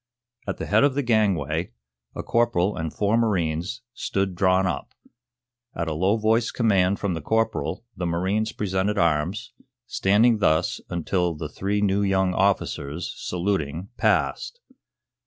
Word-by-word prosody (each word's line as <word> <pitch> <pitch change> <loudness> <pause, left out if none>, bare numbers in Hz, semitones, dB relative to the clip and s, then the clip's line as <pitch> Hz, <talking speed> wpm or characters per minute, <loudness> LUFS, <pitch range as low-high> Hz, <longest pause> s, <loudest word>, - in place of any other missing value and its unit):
At 95 - -2
the - - -4
head 110 +5 +3
of 140 -2 +3
the 145 - 0
gangway 90 - +1 0.4
a - - -4
corporal 110 -5 +1
and 80 -1 -3
four 105 +2 +1
marines 95 0 -1
stood 95 -4 -2
drawn 95 +1 +2
up. 90 - -4 0.8
At 85 - -2
a 80 - -1
low 95 +7 +2
voiced 110 +2 +1
command 100 -5 +2
from 100 -3 -1
the 80 - -4
corporal 110 +5 -1
the 90 - -3
marines 95 +6 0
presented 100 +1 -1
arms, 85 - 0 0.3
standing 110 +3 +3
thus 80 -4 +1
until 85 0 -1
the 75 0 -5
three 100 +6 -2
new 100 0 +2
young 95 -2 +1
officers, 90 -5 -1
saluting, 90 -2 -2
passed. 480 - 0
95 Hz, 140 wpm, -24 LUFS, 85-110 Hz, 0.8 s, head